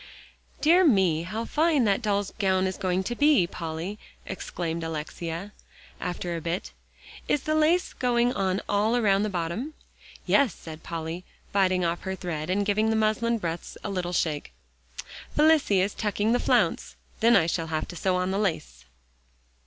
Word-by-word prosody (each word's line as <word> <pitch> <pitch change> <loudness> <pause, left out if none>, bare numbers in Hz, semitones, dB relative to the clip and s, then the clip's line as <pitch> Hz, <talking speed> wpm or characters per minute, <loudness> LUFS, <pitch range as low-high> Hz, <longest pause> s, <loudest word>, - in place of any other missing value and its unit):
"Dear 345 +4 +5
me, 190 - +3
how 215 +7 -4
fine 310 -2 +2
that 200 0 +2
doll's 205 -3 -1
gown 190 -2 +2
is 190 0 -2
to 185 +5 -1
be, 290 - +4
Polly," 170 +5 -5 0.3
exclaimed 170 -3 -4
Alexia 165 +4 -5 0.5
after 175 -1 -3
a 165 - -4
bit. 170 +4 -3 0.6
"Is 290 - +1
the 310 - 0
lace 310 +3 +2
going 245 -1 +1
on 190 -1 0
all 210 +3 +2
around 200 -4 +3
the 215 - 0
bottom?" 190 - -3 0.5
"Yes," 270 -9 +3
said 160 -1 -10
Polly, 165 +1 -5 0.3
biting 185 -2 +2
off 170 +1 -1
her 190 0 -3
thread, 170 -4 -4
and 200 +2 +1
giving 215 +2 +2
the 220 - +2
muslin 220 +2 +1
breadths 170 -4 -5
a - - -3
little 180 -2 -2
shake; 155 -4 -1 0.8
"Felicie 300 -11 +4
is 195 +2 0
tucking 210 0 0
the 245 - +3
flounce; - - +1 0.2
then 235 +1 +5
I 160 - +5
shall 165 0 -1
have 155 -1 -2
to 175 - -7
sew 185 +2 0
on 180 +1 0
the 195 - 0
lace." 65 - -2
190 Hz, 165 wpm, -26 LUFS, 170-225 Hz, 0.8 s, Dear